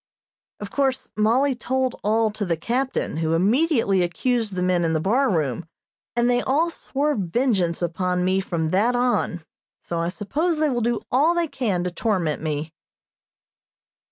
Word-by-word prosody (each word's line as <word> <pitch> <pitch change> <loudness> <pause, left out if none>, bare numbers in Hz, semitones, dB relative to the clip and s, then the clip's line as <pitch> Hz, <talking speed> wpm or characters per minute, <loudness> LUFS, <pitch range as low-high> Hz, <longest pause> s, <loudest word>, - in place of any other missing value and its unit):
Of 205 -1 -7
course 265 -2 0
Mollie 245 +6 +3
told 255 +1 -2
all 220 +1 +2
to 210 0 -4
the 170 -4 -1
captain, 250 - -2
who 160 0 0
immediately 225 - +2
accused 215 +4 -1
the 180 - -1
men 180 -1 +2
in 165 -1 +1
the 160 - +1
bar 245 - +2
room, 155 - -1 0.5
and 240 0 +2
they 245 0 +2
all 315 +7 +1
swore 295 -1 -1
vengeance 190 - 0
upon 180 +1 -1
me 190 +1 +2
from 160 -4 -2
that 225 +6 +2
on, 245 -8 0 0.4
so 170 - -3
I 165 - 0
suppose 295 - -1
they 310 0 +2
will 240 -1 -1
do 235 0 0
all 300 +7 +3
they 340 -1 +1
can 235 - -1
to 180 - -2
torment 175 -6 -1
me. 155 0 -3
215 Hz, 165 wpm, -23 LUFS, 175-260 Hz, 0.5 s, Mollie